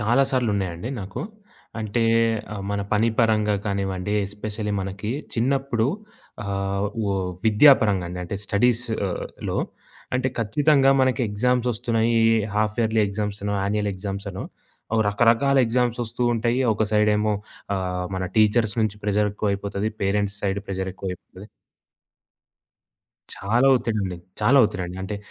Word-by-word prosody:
చాలా 120 +6 +3
సార్లు 125 -4 +1
ఉన్నాయండి 95 +1 -3
నాకు. 95 +1 -6 0.6
అంటే 110 +2 -1 0.7
మన 100 - -1
పని 110 +2 +3
పరంగా 105 -3 +3
కానివ్వండి. 100 -1 -2 0.2
ఎస్పెషల్లీ 105 +1 -5
మనకి 95 +2 -4 0.2
చిన్నప్పుడు 130 -1 +1 0.6
ఆహ్, 100 0 -1 0.2
వ్ - - -1 0.4
విద్యా 110 +7 +8
పరంగా 100 -4 +1
అండి. 90 +1 -6
అంటే 95 +3 -4
స్టడీస్‌లో 110 -3 -1 0.6
అంటే 130 +1 +1
ఖచ్చితంగా 135 +5 +3
మనకి 130 0 +2
ఎగ్జామ్స్ 125 +4 +1
వస్తున్నాయి. 115 0 0 0.4
హాల్ఫ్ 105 +1 0
యర్లీ 110 0 +2
ఎగ్జామ్స్ 105 0 -3
అనో 100 0 -1
యాన్యుయల్ 105 +1 0
ఎగ్జామ్స్ 100 +1 -5
అనో 95 - -6 0.6
రకరకాల 115 +6 +3
అవి 135 - +6
ఎగ్జామ్స్ 120 0 0
వస్తూ 115 +2 -5
ఉంటాయి. 120 +3 0
ఒక 105 - 0
సైడ్ 105 0 +4
ఏమో 105 0 +1 0.4
ఆహ్, 90 -1 -2
మన 95 - -2
టీచర్స్ 110 0 +3
నుంచి 105 -1 -1
ప్రెషర్ 105 0 +1
ఎక్కువ 105 0 -1
అయిపోతది. 100 +1 -2
పేరెంట్స్ 100 +1 0
సైడ్ 100 0 0
ప్రెషర్ 95 -1 -3
ఎక్కువైపోతుంది. 95 +2 -8 1.9
చాలా 115 +7 +1
ఒత్తిడి 115 -3 -2
అండి. 95 -2 -3 0.2
చాలా 140 +3 +5
ఒత్తిడి 100 -4 -2
అండి. 90 +1 -8
అంటే 100 +2 -4
105 Hz, 135 wpm, -24 LUFS, 100-115 Hz, 1.9 s, విద్యా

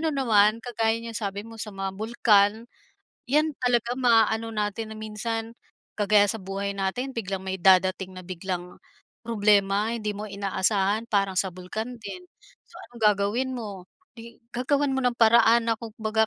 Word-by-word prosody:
ano 320 - 0
naman, 225 -7 +3
kagaya 225 -2 0
niyang 230 -1 -5
sabi 200 0 -4
mo 225 0 -12
sa 215 - -5
mga 195 -1 -4
bulkan, 210 -3 +4 0.7
'yan 300 +4 +2
talaga 245 0 0
maaano 225 -2 +2
natin 210 +1 -3
na - - -10
minsan, 225 +1 -4 0.5
kagaya 205 -1 +4
sa 225 - -4
buhay 195 +1 -4
natin 200 +7 -2
biglang 195 -5 -4
may 190 0 -4
dadating 185 0 +3
na 185 - -9
biglang 180 0 -6 0.5
problema, 205 -1 +2
hindi 210 -3 -3
mo 210 +1 -6
inaasahan 200 +2 0
parang 195 -2 +1
sa 190 0 +1
bulkan 215 +7 -6
din. 360 - -8 0.5
So, - - -13
anong 235 -2 -13
gagawin 210 +6 -1
mo? 205 -7 -6 0.3
'Di, 230 0 -13
gagawan 275 +4 0
mo - - 0
ng 245 -1 +2
paraan 230 0 +5
na 225 - 0
kumbaga, 220 -1 -1
215 Hz, 160 wpm, -25 LUFS, 195-230 Hz, 0.7 s, paraan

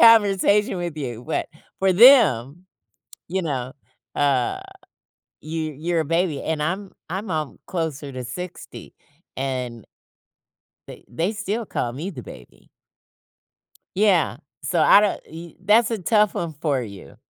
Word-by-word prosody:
conversation 205 -3 +5
with 170 -3 -4
you, 125 -5 -5
but 160 - -1 0.3
for 190 -1 +4
them, 180 - +6 0.6
you 190 +2 -1
know, 130 -5 -3 0.4
uh, 140 -4 +1 0.8
you 155 -1 -4
you're 170 +1 0
a 160 - -1
baby, 165 -2 0
and 155 -2 -2
I'm 190 +5 -3 0.2
I'm 190 +2 -4
alm 155 -3 -3
closer 155 -5 -3
to 130 -1 -6
60, 180 +8 -8 0.4
and 125 -4 -4 1.0
they - - -12
they 165 - -1
still 215 +2 -3
call 120 -8 -2
me 160 +10 -5
the 130 -8 -8
baby. 60 - -14 1.3
Yeah, 190 -8 +2 0.2
so 165 +5 0
I 200 - +8
don't, 210 -2 0
y 165 +1 -10
that's 215 +4 +4
a 225 - -1
tough 210 +2 +2
one 170 -2 -3
for 145 -4 -1
you. 100 -10 -10
165 Hz, 135 wpm, -23 LUFS, 135-195 Hz, 1.3 s, I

